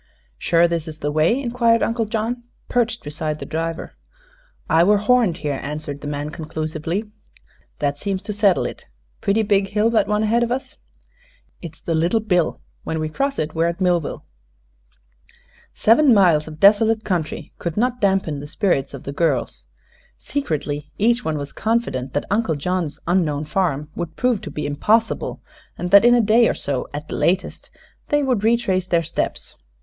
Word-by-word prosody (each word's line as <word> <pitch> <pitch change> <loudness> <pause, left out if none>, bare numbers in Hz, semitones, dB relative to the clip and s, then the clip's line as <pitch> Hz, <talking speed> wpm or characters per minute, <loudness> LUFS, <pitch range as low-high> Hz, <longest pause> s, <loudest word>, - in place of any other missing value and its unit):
"Sure 170 0 +3
this 170 -1 -2
is 155 -1 -7
the 145 -1 -2
way?" 155 - +2
inquired 235 -3 +2
Uncle 230 0 0
John, 225 +3 -2 0.3
perched 235 -1 0
beside 150 +1 -3
the - - -7
driver. 165 +1 -4 0.7
"I 165 +1 +4
were 205 +3 +4
horned 215 -4 +2
here," 145 -2 -1
answered 145 -1 -5
the 145 - -6
man, 145 +1 -4
conclusively. 160 +6 -4 0.7
"That 145 -1 -1
seems 195 0 -3
to 210 0 -4
settle 200 -3 +3
it. - - -7 0.3
Pretty 210 +3 +2
big 200 -1 +2
hill, 210 +3 +1
that 215 -4 +2
one 210 0 +1
ahead 225 +2 +2
of 240 0 0
us." 260 +2 -3 0.9
"It's 165 -2 -9
the 165 - -3
Little 170 +8 +2
Bill. 180 -6 0 0.2
When 160 - -3
we 155 0 -2
cross 275 - -1
it, 155 0 -2
we're 165 +1 +1
at 170 +2 -3
Millville." 175 -4 0 1.5
Seven 245 +3 +5
miles 170 -6 +4
of 155 -1 -9
desolate 215 +3 +5
country 175 -7 -3
could 170 +1 -4
not 245 +2 0
dampen 190 -7 +1
the 145 - -8
spirits 145 -7 0
of 135 - -10
the 140 - -5
girls. 165 +3 -1 0.5
Secretly 150 - -3
each 235 +3 +2
one 155 -1 -1
was 140 -1 -6
confident 220 - -1
that 145 - -1
Uncle 200 -6 +1
John's 170 +1 -2
unknown 160 -4 +1
farm 150 -3 -1
would 170 -2 -5
prove 250 -5 +1
to - - -7
be 150 0 -4
impossible, 215 +11 0 0.3
and 175 +1 -4
that 200 +1 +8
in 240 +1 +6
a 240 - +4
day 225 +2 +4
or - - -1
so 135 -3 -2
at 150 +1 -6
the - - -5
latest 185 +3 -1 0.4
they 295 0 +2
would 250 -6 0
retrace 220 -5 +1
their 170 -2 +2
steps. 165 - -3
180 Hz, 175 wpm, -21 LUFS, 155-220 Hz, 1.5 s, that